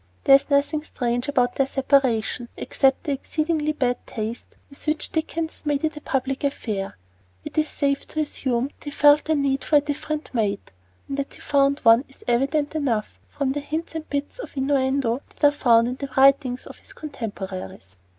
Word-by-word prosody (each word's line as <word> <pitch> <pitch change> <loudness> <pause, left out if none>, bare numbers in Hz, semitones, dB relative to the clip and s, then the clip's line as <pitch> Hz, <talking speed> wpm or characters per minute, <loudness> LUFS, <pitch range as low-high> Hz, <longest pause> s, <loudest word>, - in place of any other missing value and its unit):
There 275 - +6
is 275 - +1
nothing 290 +2 +2
strange 245 -4 -2
about 250 -4 +1
their 270 - +2
separation, 260 -4 +1
except 270 -1 +1
the 295 - -2
exceedingly 305 +2 -1
bad 250 -5 0
taste 225 +1 -5
with 280 +2 -12
which 305 0 -1
Dickens 320 0 -2
made 290 -1 0
it 315 -1 0
a 300 - -8
public 270 0 -2
affair. 210 - -2 0.5
It - - -7
is 310 0 +1
safe 280 -1 -1
to 310 - -4
assume 260 -3 -1
that - - -16
he - - -3
felt 290 +1 +5
the 315 - +2
need 275 -2 +1
of - - -7
a 295 - +9
different 300 +1 -4
mate; 205 - -1 0.4
and 275 - -4
that 280 -1 -4
he - - -15
found 280 0 +2
one 230 +2 +6
is 270 - -18
evident 275 +5 +1
enough 255 -9 -1
from 275 -2 -2
the 290 - -2
hints 310 +4 -4
and 320 -1 -6
bits 285 +10 -3
of - - -8
innuendo 265 -2 +1
that 295 - +5
are - - +4
found 235 -5 +4
in 250 +1 -3
the 275 0 -5
writings 270 -2 +4
of - - -11
his - - -11
contemporaries. 190 - -7
275 Hz, 190 wpm, -24 LUFS, 245-295 Hz, 0.5 s, a